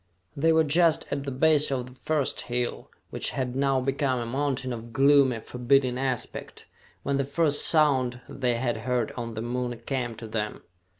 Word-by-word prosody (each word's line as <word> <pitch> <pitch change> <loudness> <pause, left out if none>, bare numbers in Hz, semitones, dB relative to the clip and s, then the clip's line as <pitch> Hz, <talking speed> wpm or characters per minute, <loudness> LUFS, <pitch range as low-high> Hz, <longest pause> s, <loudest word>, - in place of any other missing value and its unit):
They 160 +3 +3
were 160 0 +4
just 160 +2 +3
at 140 - -2
the 140 - -3
base 150 +3 +3
of 125 -2 -1
the 125 - -12
first 145 +2 -2
hill, 120 0 -2 0.2
which - - -1
had 130 -1 -3
now 135 -1 +2
become 135 0 0
a 120 - -3
mountain 130 0 -2
of 115 0 -8
gloomy, 135 -3 +4
forbidding 125 +1 +1
aspect, 130 -3 -4 0.4
when 140 -1 0
the 140 - +1
first 145 +1 +1
sound 130 -6 +3
they 125 -3 -1
had 120 -1 -1
heard 120 0 -1
on 115 -2 -6
the 110 - -4
moon 120 0 -3
came 125 -4 -2
to 115 - -9
them. 105 -1 -4
130 Hz, 180 wpm, -26 LUFS, 120-140 Hz, 0.4 s, were